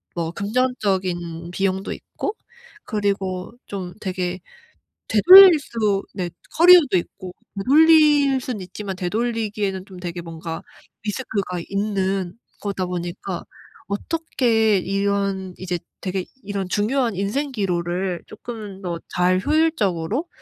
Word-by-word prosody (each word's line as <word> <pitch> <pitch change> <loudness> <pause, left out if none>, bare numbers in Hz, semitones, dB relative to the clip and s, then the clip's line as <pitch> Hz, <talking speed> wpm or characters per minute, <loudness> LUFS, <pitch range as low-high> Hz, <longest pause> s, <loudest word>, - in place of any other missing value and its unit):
뭐 165 -1 -2
금전적인 190 -7 -1
비용도 190 +1 -1
있고 420 - -5 0.5
그리고 195 -2 -2
좀 185 -3 -6
되게 185 -1 -3 0.7
되돌릴 360 - +9
수 210 -7 -1
네. 180 -3 -3 0.3
커리어도 340 - +7
있고 180 +1 -6 0.2
되돌릴 295 +2 +5
수는 245 -5 -4
있지만 190 +1 -6
되돌리기에는 205 -1 -2
좀 185 -3 -12
되게 175 -1 -5
뭔가 165 0 -6 0.4
리스크가 205 -5 -3
있는 195 -1 -1 0.2
거다 195 -2 -2
보니까 175 +1 -5 0.4
어떻게 225 -3 +1
이런 195 -1 -1
이제 180 -2 -3 0.2
되게 185 -1 -3 0.2
이런 200 -2 -3
중요한 225 +2 0
인생 265 +9 -1
기로를 180 -3 -2
조금 210 -3 -8
더 170 -2 -4 0.2
잘 185 +1 +3
효율적으로 280 - +1
195 Hz, 250 characters per minute, -22 LUFS, 180-230 Hz, 0.7 s, 되돌릴